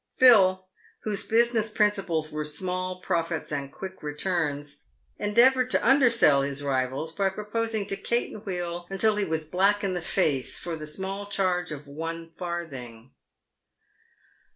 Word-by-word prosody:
Phil, 190 -7 +6 0.4
whose 210 -1 +1
business 230 -1 +3
principles 195 -7 0
were 150 0 -3
small 185 +4 -3
profits 165 -2 -2
and 140 -1 -3
quick 190 +3 -8
returns, 150 -2 -2 0.3
endeavoured 250 +5 +4
to - - +1
undersell 235 - +5
his 140 +1 -3
rivals 135 +3 -1
by 195 +3 +1
proposing 215 +1 -2
to 195 - -3
caten 220 +1 -2
wheel 175 -3 -4
until 210 +3 +2
he 205 - +1
was 160 -2 -2
black 195 +6 +2
in 195 -2 0
the 180 - -2
face 140 -5 0
for 170 -2 -4
the 155 -1 -6
small 195 +5 -5
charge 180 -4 0
of 150 -1 -7
one 165 +3 -6
farthing. 135 -10 -6
180 Hz, 140 wpm, -26 LUFS, 155-205 Hz, 0.4 s, Phil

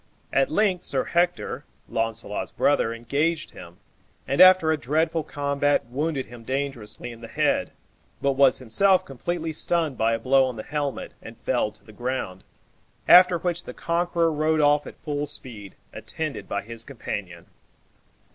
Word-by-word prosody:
At 135 0 +3
length 190 0 +1
Sir - - 0
Hector, 175 +1 0 0.2
Launcelot's 115 -2 -3
brother, 140 -5 +1
engaged 140 +8 -1
him, 85 0 -12 0.5
and, 140 - +2
after 185 -3 +7
a - - +3
dreadful 155 +5 0
combat, 145 -2 0
wounded 140 +3 -2
him 120 -1 -12
dangerously 130 -3 -4
in 115 0 -12
the 115 - -8
head, - - 0 0.5
but 140 - +1
was 135 -1 +4
himself 185 - +2
completely 160 +4 -4
stunned 160 -3 -1
by 115 +1 +2
a - - +1
blow 130 +3 +4
on 130 -2 -4
the 110 - -6
helmet, 145 -2 -3
and 110 0 -11
felled 120 -5 0
to - - -15
the 110 - -15
ground; 120 -6 -4 0.6
after 180 0 +8
which 175 +1 -3
the - - -8
conqueror 170 -1 0
rode 155 +1 +1
off 145 0 +3
at - - -10
full 145 -1 -2
speed, 115 -9 -7 0.2
attended 155 -3 -5
by 100 0 -2
his 115 +1 -6
companion. 100 -10 -6
140 Hz, 155 wpm, -25 LUFS, 115-160 Hz, 0.6 s, after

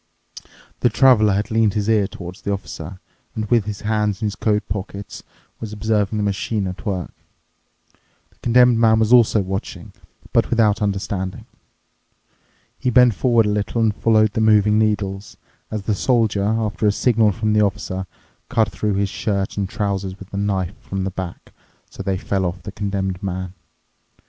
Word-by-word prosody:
The 120 - +3
Traveler 110 -4 +5
had 100 +3 -2
leaned 110 -2 +2
his 105 -1 -1
ear 105 -3 +3
towards 90 -1 -9
the 100 - -3
Officer 95 -2 -6 0.4
and, 110 - -2
with 115 -4 +3
his 105 -2 -5
hands 105 -2 0
in - - -2
his 105 -1 -2
coat 105 -1 0
pockets, 100 +1 -6 0.4
was 110 -2 -6
observing 105 -1 0
the 105 - 0
machine 100 +1 -1
at 95 +4 -6
work. 95 -4 -3 1.2
The - - -31
Condemned 120 0 +4
Man 110 -1 +5
was 110 +1 +3
also 115 -3 +5
watching, 95 +1 -5 0.4
but - - +3
without 110 -3 +2
understanding. 95 -2 -3 1.3
He 125 - 0
bent 125 -1 +5
forward 115 +1 +3
a - - +1
little 105 +3 -1
and 110 -2 +2
followed 110 -2 +3
the 110 - 0
moving 105 -1 +4
needles, 105 -2 -1 0.3
as 110 -2 -4
the 105 - 0
Soldier, 110 -3 +1
after 110 0 0
a - - +5
signal 110 0 +2
from 105 +3 -1
the 105 - +4
Officer, 95 -2 -2 0.4
cut 110 -1 +1
through 105 -2 -1
his 100 0 0
shirt 100 -1 -2
and 100 -2 -2
trousers 100 -2 -3
with 100 0 -13
a - - -3
knife 100 -2 -1
from 95 -1 -4
the 95 - -2
back, 95 -2 -7 0.4
so - - -17
that - - -9
they 95 - 0
fell 95 0 -1
off 90 -1 -3
the 100 - -6
Condemned 95 -2 -3
Man. 95 -2 -4
105 Hz, 175 wpm, -21 LUFS, 95-110 Hz, 1.3 s, Traveler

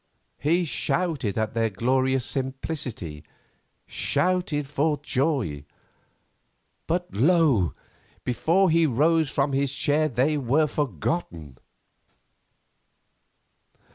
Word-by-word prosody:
He 170 +4 +2
shouted 150 - -1
at 110 -1 -1
their 115 -1 +1
glorious 130 +4 +1
simplicity—shouted 140 - -3
for 145 +1 0
joy; 130 - -1 1.2
but 175 +2 -1
lo! 135 - +3 0.5
before 165 - +2
he 165 0 +4
rose 155 +4 +2
from 140 0 0
his 135 0 +1
chair 150 +3 +2
they 140 +4 +1
were 140 +4 +2
forgotten. 90 - -3
140 Hz, 80 wpm, -25 LUFS, 120-160 Hz, 1.2 s, he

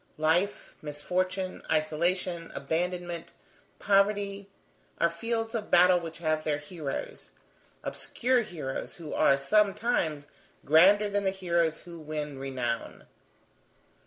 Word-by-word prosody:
Life, 170 +6 +1
misfortune, 185 +5 -2
isolation, 170 +2 0
abandonment, 175 +3 -3 0.4
poverty, 200 0 +1 0.5
are 170 - +3
the - - -11
fields 225 +4 -2
of 220 -3 -3
battle 180 +1 +6
which 165 -1 -7
have 155 -2 0
their 150 -2 0
heroes; 145 -1 -6 0.5
obscure 250 0 0
heroes, 155 - -5
who 165 -5 -8
are, 140 -3 +4
sometimes, 195 - +1 0.4
grander 190 +8 +6
than 205 0 -1
the 190 - +2
heroes 170 -4 0
who 170 -1 -10
win 150 -2 -5
renown. 125 -4 -3
170 Hz, 110 wpm, -29 LUFS, 155-195 Hz, 0.5 s, battle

